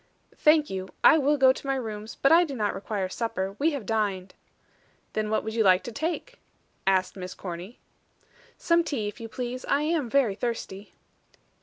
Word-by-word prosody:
"Thank 305 -1 +4
you. 190 0 -4 0.2
I 320 - +7
will 290 +1 +2
go 260 -1 +6
to 275 - -9
my 270 - +1
rooms, 220 -3 -5
but 275 - +2
I 335 +2 +7
do 290 -5 -5
not 210 -4 0
require 195 0 -3
supper. 195 -2 -3
We 305 +3 +3
have 270 -7 -5
dined." 200 -4 -1 0.8
"Then 215 -1 -1
what 215 - 0
would 220 - -4
you 225 -1 +2
like 185 -2 +5
to 240 - -6
take?" 330 - -4 0.5
asked 190 -1 +2
Miss 185 -1 -7
Corny. 180 +5 -7 0.8
"Some 335 0 +2
tea, 250 -10 -2
if 210 - -7
you 225 -1 -7
please, 250 +2 -5
I 285 +1 +1
am 305 -5 0
very 255 -5 +3
thirsty." 210 -2 -5
225 Hz, 185 wpm, -26 LUFS, 195-280 Hz, 0.8 s, I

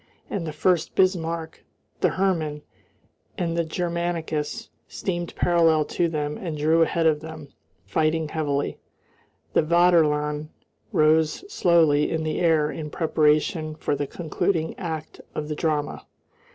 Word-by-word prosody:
And 175 -5 -2
the - - -3
Furst 170 +3 +1
Bismarck, 170 -3 0 0.4
the - - +3
Hermann, 160 -6 0 0.7
and 170 -2 -1
the 170 - +1
Germanicus 170 +2 -3 0.2
steamed 175 -3 -4
parallel 165 -3 +3
to 175 - +2
them 150 -2 -3
and 165 -5 -4
drew 160 +3 +3
ahead 165 0 +2
of 155 -2 +3
them, 155 -2 -9 0.4
fighting 160 0 +1
heavily. 145 -3 -2 0.7
The - - +4
Vaterland 155 -3 +3 0.4
rose 155 - +3
slowly 160 - +4
in 160 -1 -1
the 155 0 -2
air 160 -3 +3
in 155 -2 -6
preparation 155 0 +1
for 150 - -1
the 145 0 -2
concluding 165 +1 -1
act 160 -3 -5
of 150 0 -4
the 150 - -2
drama. 150 -2 -2
160 Hz, 130 wpm, -24 LUFS, 150-170 Hz, 0.7 s, The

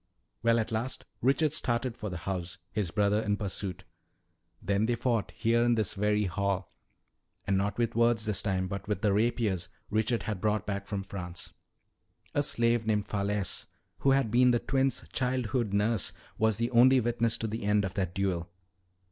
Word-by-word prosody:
"Well, 115 0 +4
at 110 -1 -1
last 115 +4 -2 0.2
Richard 140 +4 +2
started 120 -3 -1
for 105 -3 -5
the 90 - -4
house, 90 +1 -4
his 105 -5 -1
brother 105 +3 +2
in 105 -2 0
pursuit. 95 -2 -4 0.8
"Then 100 +3 +1
they 120 - +2
fought, 120 -3 0
here 115 0 +1
in 120 0 +3
this 110 -4 0
very 105 +1 +1
hall. 100 -1 -1 0.7
And 100 - +1
not 100 +1 0
with 120 -1 0
words 115 -1 +3
this 105 -3 -1
time, 95 -2 0
but 100 +2 -5
with 105 +2 -2
the 105 -2 +3
rapiers 105 -5 +1 0.2
Richard 110 +2 +1
had 105 -4 -3
brought 105 -1 +1
back 100 -1 -3
from 100 -2 -3
France. 90 -3 -7 0.8
A 145 - +2
slave 115 -5 +1
named 105 -2 +1
Falesse, 100 -1 -1 0.3
who 135 - +2
had 135 -5 +3
been 125 +2 +5
the 120 - +4
twins' 135 +1 0
childhood 125 -3 0
nurse, 105 +1 +1 0.2
was 110 -2 +2
the 115 +2 -1
only 130 +2 +6
witness 115 -1 +1
to - - -3
the 110 +1 -3
end 105 0 +2
of 95 - -4
that 90 -3 -2
duel. 90 -3 -1
105 Hz, 180 wpm, -30 LUFS, 100-120 Hz, 0.8 s, only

